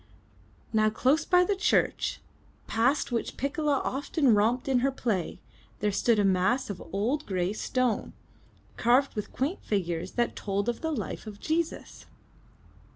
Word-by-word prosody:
Now 215 0 +4
close 270 +8 +2
by 360 0 +5
the 400 +2 0
church, 410 +3 +1 0.4
past 245 +5 +1
which 235 - -2
Piccola 285 +1 0
often 275 -1 +1
romped 225 +5 +2
in 260 -2 +3
her 270 +3 +2
play, 215 -9 -2 0.4
there 210 0 +1
stood 225 +3 +2
a 205 - +3
mass 195 +6 +2
of 185 - -8
old 240 +10 -1
gray 185 0 -1
stone, 250 +1 -1 0.6
carved 250 +4 +3
with 210 - -5
qaint 290 +9 -2
figures 180 -3 -2
that 240 -1 0
told 200 +1 -2
of 240 -1 -2
the 320 - -1
life 220 - -4
of 205 -1 -8
Jesus. 325 +4 -3
240 Hz, 150 wpm, -28 LUFS, 205-280 Hz, 0.6 s, by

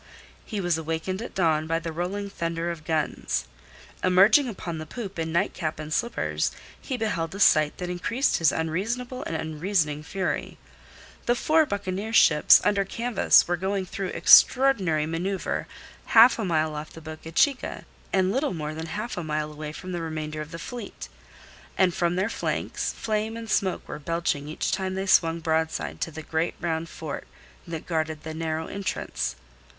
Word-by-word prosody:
He 210 - -4
was 175 -3 +1
awakened 165 +5 -3
at 235 - -7
dawn 160 -4 +2
by 165 +1 +1
the 165 0 -4
rolling 180 +5 -3
thunder 170 -2 -3
of 160 -2 -8
guns. 155 -2 -1 0.6
Emerging 200 +9 +5
upon 170 -6 -5
the 155 - -7
poop 200 -3 -6
in 160 0 -2
nightcap 170 -2 -1
and 155 0 -5
slippers, 235 +7 0 0.3
he 260 - -3
beheld 190 -7 -2
a - - -6
sight 155 -6 +4
that 180 - -4
increased 230 +10 0
his 165 -2 +4
unreasonable 230 +11 -2
and 165 - -3
unreasoning 160 -1 -1
fury. 190 +5 -3 0.7
The 240 - +4
four 310 +4 +3
buccaneer 200 +2 -3
ships 150 -8 +7
under 200 -1 +2
canvas 230 +3 +3
were 175 - +1
going 190 +1 -1
through 195 +1 -4
extraordinary 195 - +5
manoeuvre 180 +5 -2 0.4
half 230 +2 +7
a 220 - -1
mile 155 -3 +1
off 150 +1 -6
the - - -10
Boca 160 0 -9
Chica 270 - +1 0.3
and 190 -1 +2
little 265 -1 0
more 155 -1 -4
than 160 +1 -5
half 215 +6 -4
a 175 - -2
mile 150 -1 -2
away 150 0 -6
from 185 +4 -8
the 175 -1 -3
remainder 155 -1 -4
of 155 - -7
the 165 - -7
fleet, 230 +4 -7 0.7
and 185 -2 +4
from 175 0 0
their 190 +3 +1
flanks - - -2
flame 220 0 -2
and 225 -2 -6
smoke 190 -3 0
were 150 - -6
belching 160 -2 -1
each 155 - -2
time 190 -1 -1
they 190 0 -2
swung 165 -3 +3
broadside 160 0 -1
to - - -1
the 160 0 -8
great 160 +2 -1
round 165 -1 -2
fort 155 -3 -6 0.4
that 165 -2 -5
guarded 160 -2 -2
that 160 0 -6
narrow 160 0 -2
entrance. 65 - -3
170 Hz, 175 wpm, -26 LUFS, 160-200 Hz, 0.7 s, ships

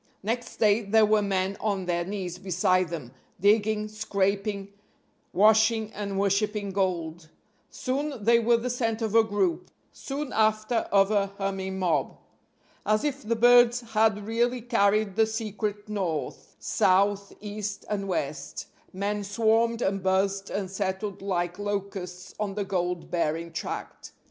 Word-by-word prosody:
Next 235 +3 -3
day 215 0 +4
there 215 +1 +4
were 215 0 +3
men 195 -1 -1
on 200 -3 -1
their 175 -1 0
knees 180 -2 -5
beside 185 -1 +1
them, 150 -8 -6 0.3
digging, 210 +2 +2
scraping, 200 -1 -1 0.6
washing 220 +2 +4
and 200 -1 -4
worshipping 200 +1 0
gold. 170 -4 -2 0.4
Soon 270 -2 -3
they 235 +2 +5
were 235 +1 +3
the 245 +2 -3
center 230 -2 -1
of 215 - -4
a 225 0 +6
group 195 -4 -1 0.2
soon 280 0 -5
after 215 +1 +1
of 195 0 +4
a 200 -2 +2
humming 190 -1 -3
mob. 165 -7 0 0.7
As 215 +1 +1
if 285 -2 -2
the 230 +2 -1
birds 245 +1 +6
had 215 -2 +2
really 240 +3 0
carried 215 -3 +2
the 220 0 +4
secret 215 -2 -4
north, 175 -9 -4
south, 200 +1 +2
east 210 -1 -5
and 200 -2 -2
west, 155 -5 -3 0.3
men 205 +2 -2
swarmed 225 +3 +1
and 195 0 0
buzzed 195 +1 0
and 195 -2 -3
settled 195 0 -3
like 180 -2 -2
locusts 195 -3 -4
on 205 -2 -2
the 205 -1 -2
gold 180 -2 -2
bearing 165 0 -1
tract. - - -6
205 Hz, 140 wpm, -27 LUFS, 190-220 Hz, 0.7 s, a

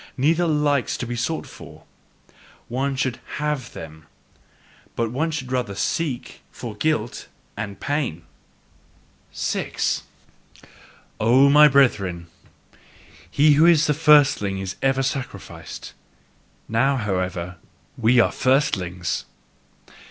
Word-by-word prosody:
Neither 160 +6 +2
like 150 -4 +1
to - - -3
be 120 +1 -4
sought 140 +7 -2
for. - - -13 0.9
One 135 +3 -1
should 130 -2 -2 0.2
HAVE 150 -3 -3
them, 80 -2 -10 0.9
but 115 -1 -1
one 155 +6 -1
should 140 -5 -5
rather 125 -6 -2
SEEK 135 +4 -3
for 115 -4 -8
guilt 120 -3 -2 0.3
and 100 -2 -6
pain! 140 - -2 1.1
6. - - -2 1.2
O 130 +5 +5
my 150 +1 +8
brethren, 100 -11 +2 1.0
he 150 +1 +4
who 155 +4 +5
is 155 -3 +5
a - - +4
firstling 145 -10 +4
is 95 -1 -5
ever 135 0 +2
sacrificed. 135 0 -6 0.7
Now, 135 +5 +2
however, 95 -5 -2
are 90 0 -12 0.4
we 120 +1 +3
firstlings! 95 - 0
130 Hz, 105 wpm, -22 LUFS, 105-145 Hz, 1.2 s, my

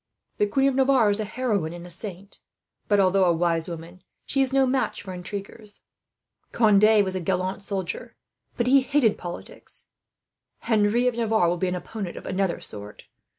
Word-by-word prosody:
The 210 - +3
Queen 270 +6 +2
of 275 - +2
Navarre 260 -5 +4
is 205 - -2
a 215 - -1
heroine 210 -8 -2
and 175 0 -9
a - - -10
saint 195 +1 -8 0.5
but, 205 -1 +3
although 190 0 +4
a 175 - +4
wise 165 0 0
woman, 170 +2 -9 0.2
she 275 - 0
is 265 -1 +1
no 270 0 +4
match 260 +1 -1
for 190 -2 -7
intriguers. 200 +3 -8 0.7
Conde 215 -1 +5
was 190 - -3
a 185 - -2
gallant 185 +2 -2
soldier, 195 -3 -4 0.4
but 235 - +1
he 270 +2 +5
hated 260 -5 +2
politics. 175 -1 -9 0.8
"Henry 225 +2 +2
of 245 -2 0
Navarre 220 -6 +2
will 175 - 0
be 185 - -1
an 180 - -1
opponent 185 +1 -6
of - - -9
another 185 -2 -1
sort. 105 0 -10
200 Hz, 180 wpm, -25 LUFS, 180-230 Hz, 0.8 s, Conde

